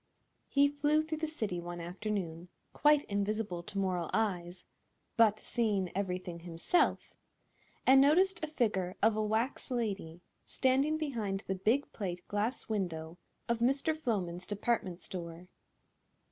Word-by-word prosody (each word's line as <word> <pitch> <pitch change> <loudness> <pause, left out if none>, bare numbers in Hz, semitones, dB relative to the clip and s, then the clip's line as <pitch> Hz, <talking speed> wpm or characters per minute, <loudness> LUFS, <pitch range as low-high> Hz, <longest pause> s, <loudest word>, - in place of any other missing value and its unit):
He 280 0 +4
flew 295 +2 +2
through 315 0 -4
the 315 - -1
city 215 - -3
one 175 0 -6
afternoon—quite 190 - 0
invisible 200 -3 -2
to 200 +3 -8
mortal 180 -4 0
eyes, 180 -5 -1 0.5
but 220 -2 +5
seeing 210 -6 -1
everything 180 -3 -3
himself—and 180 - 0
noticed 355 +6 +4
a - - 0
figure 210 - 0
of 220 0 +5
a 215 - 0
wax 220 +7 -1
lady 200 -9 -3 0.3
standing 275 +4 +2
behind 225 -11 -2
the 190 - -1
big 220 +9 +1
plate 180 -4 -5
glass 210 +5 -1
window 175 -5 -3 0.3
of 235 -1 0
Mr. 275 +6 +2
Floman's 185 - -2
department 205 -3 -1
store. 175 0 -7
210 Hz, 125 wpm, -32 LUFS, 180-260 Hz, 0.5 s, but